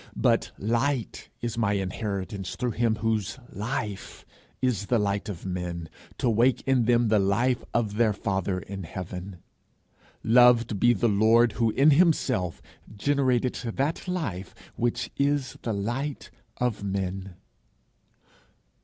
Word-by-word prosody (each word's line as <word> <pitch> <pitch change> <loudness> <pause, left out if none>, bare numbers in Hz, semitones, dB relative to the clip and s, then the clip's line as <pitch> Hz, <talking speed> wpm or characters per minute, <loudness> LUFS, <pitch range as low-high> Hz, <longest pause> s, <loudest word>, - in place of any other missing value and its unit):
But - - +2
light 120 +3 -1
is 115 -1 -3
my 105 -3 +2
inheritance 95 -1 -3
through 125 -1 -1
him 115 -1 +1
whose 110 -1 -1
life 105 -2 -5 0.3
is 115 -6 0
the 120 - +2
light 100 -1 -1
of 95 -3 -7
men, 90 -3 -4 0.3
to - - -1
wake 120 +3 +3
in 130 -3 +3
them 120 -1 +3
the 110 -1 +4
life 120 +6 +1
of 110 -3 -1
their 115 -2 +4
father 95 -2 -1
in 95 +2 -6
heaven. 90 +1 -7 0.8
Loved 120 -2 +5
be 120 +3 +5
the 120 +2 +1
Lord 110 +3 +4
who 115 0 +1
in 140 +7 +4
himself 130 - +2 0.3
generated 130 0 +1 0.2
that 145 +7 -1
life 110 - -3 0.2
which 120 0 -1
is 140 -2 0
the 115 - -2
light 120 +8 -3 0.3
of 120 -5 -1
men! 95 -1 -3
110 Hz, 130 wpm, -26 LUFS, 100-125 Hz, 0.8 s, Loved